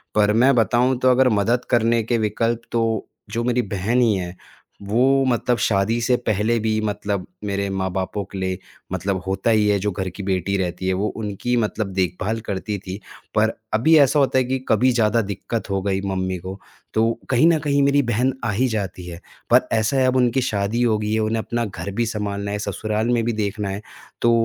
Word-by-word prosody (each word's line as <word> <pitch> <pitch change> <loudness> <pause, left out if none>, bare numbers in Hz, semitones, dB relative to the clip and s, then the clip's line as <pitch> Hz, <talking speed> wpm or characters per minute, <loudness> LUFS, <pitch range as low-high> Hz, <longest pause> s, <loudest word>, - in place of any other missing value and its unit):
पर 105 0 +4
मैं 130 +5 +5
बताऊँ 120 +3 +2
तो 130 0 +4
अगर 130 0 +4
मदद 115 +4 +1
करने 115 -1 +2
के 115 +1 0
विकल्प 115 +2 0
तो 115 -2 0 0.2
जो 115 +1 -1
मेरी 125 0 +1
बहन 105 +4 0
ही 115 -3 +4
है, 90 -1 -4 0.5
वो 130 +7 +2
मतलब 125 0 +1
शादी 110 +3 +1
से 125 +2 +3
पहले 110 0 0
भी 110 0 0
मतलब 100 -2 -2 0.2
मेरे 100 -1 -1
माँ-बापों 95 +1 -2
के 100 - -6
लिए 95 -1 -2 0.3
मतलब 95 +1 -1
होता 95 +4 0
ही 105 -2 +3
है 105 - +3
जो 105 +1 -1
घर 95 0 -3
की 95 +3 -8
बेटी 95 0 -1
रहती 90 0 -3
है, 95 - +2
वो 100 +3 0
उनकी 110 +3 -2
मतलब 110 -2 -1
देखभाल 95 +4 -1
करती 100 +1 -3
थी। 95 +1 -7 0.4
पर 110 +1 +3 0.2
अभी 155 +9 +4
ऐसा 140 +1 +4
होता 135 -1 +2
है 130 - +4
कि 130 +2 -1
कभी 125 +4 +4
ज़्यादा 115 -1 +2
दिक्कत 105 +2 -4
हो 95 -1 0
गई 95 -1 -1
मम्मी 95 -1 -2
को, 95 +3 -8 0.3
तो 115 +1 +2 0.2
कहीं 130 +5 +4
न 165 -2 +4
कहीं 140 -1 +1
मेरी 140 +1 +4
बहन 125 +5 +1
आ 115 - +1
ही 125 +6 +1
जाती 95 -6 -4
है। 85 0 -8 0.3
पर 125 +1 +5
ऐसा 110 +5 +1
है 130 - +3
अब 130 - +1
उनकी 125 0 +2
शादी 110 -1 -1
हो 110 -3 +3
गई 105 0 -2
है, 110 - +1
उन्हें 110 +1 0
अपना 120 0 -2
घर 100 -1 -6
भी 115 +4 0
सँभालना 100 -2 -3
है, 105 - -2
ससुराल 110 +3 -2
में 120 -2 +2
भी 120 - 0
देखना 105 -1 -2
है, 100 +2 -4 0.4
तो 120 - +4
110 Hz, 210 wpm, -22 LUFS, 100-120 Hz, 0.5 s, मैं